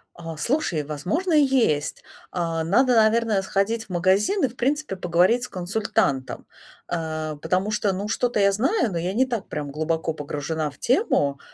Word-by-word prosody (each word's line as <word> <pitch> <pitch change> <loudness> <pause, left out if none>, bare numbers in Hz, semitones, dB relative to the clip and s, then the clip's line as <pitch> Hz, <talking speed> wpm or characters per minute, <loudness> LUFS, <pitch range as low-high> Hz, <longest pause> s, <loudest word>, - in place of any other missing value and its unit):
А, 165 -2 -7
слушай, 180 - 0
возможно, 180 - -2
и 300 -1 +6
есть. 235 - +1 0.3
А, 165 -2 -1
надо, 245 +9 +3
наверное, 220 -2 +3
сходить 200 +4 -1
в - - -28
магазин 190 - +2
и, - - +5
в 240 - -12
принципе, 285 -1 -1
поговорить 180 +6 +2
с - - -3
консультантом. 185 -7 -1 0.4
А, 155 -2 -3
потому 185 +7 -1
что, 210 -2 0
ну, 195 +2 -3
что-то 240 +1 0
я 200 0 +4
знаю, 260 - +1
но 175 - -3
я 175 +3 -2
не 255 +5 +3
так 235 -6 -4
прям 145 -1 -5
глубоко 160 +2 -1
погружена 150 +1 -3
в 140 - -21
тему. 190 - +1
190 Hz, 170 wpm, -24 LUFS, 160-235 Hz, 0.4 s, и